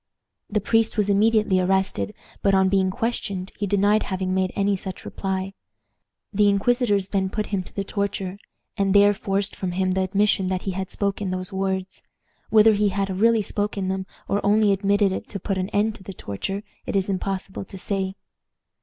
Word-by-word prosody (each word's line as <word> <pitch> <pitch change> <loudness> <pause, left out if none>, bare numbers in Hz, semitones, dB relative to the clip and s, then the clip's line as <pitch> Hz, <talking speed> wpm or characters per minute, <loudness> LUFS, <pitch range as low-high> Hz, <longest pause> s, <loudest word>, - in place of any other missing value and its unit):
The 210 - +1
priest 225 +2 +1
was 205 -1 +2
immediately 215 -1 +3
arrested, 190 +2 0 0.3
but, 195 -1 +3
on 190 0 +4
being 190 -1 +2
questioned, 200 -4 -3
he 205 - -1
denied 205 +2 +3
having 185 -1 -2
made 185 -1 +1
any 200 0 +2
such 190 0 -7
reply. 190 0 -3 0.8
The 205 0 +4
inquisitors 205 -1 +2
then 190 -2 0
put 215 +2 -2
him 195 - +1
to 180 - -12
the 200 - -1
torture, 200 -1 -3 0.4
and 195 -2 +1
there 205 0 +7
forced 195 0 0
from 185 -2 -3
him 185 0 +1
the 190 +1 +1
admission 195 0 +2
that 185 -1 -2
he 195 - -2
had 190 0 -4
spoken 200 -1 -2
those 185 +1 -4
words. 190 -1 -2 0.5
Whether 220 0 +6
he 205 0 +2
had 195 -1 -2
really 225 0 +4
spoken 205 -2 -2
them, 190 0 -2 0.2
or 200 - 0
only 210 0 +4
admitted 200 0 +2
it 190 - -4
to 200 - -5
put 190 +1 -2
an 185 +1 -2
end 215 +2 +1
to 190 - -16
the 195 - -7
torture, 195 - -4 0.2
it - - -2
is 195 -1 +2
impossible 195 0 -3
to 195 - -10
say. 190 0 -2
195 Hz, 190 wpm, -24 LUFS, 190-205 Hz, 0.8 s, there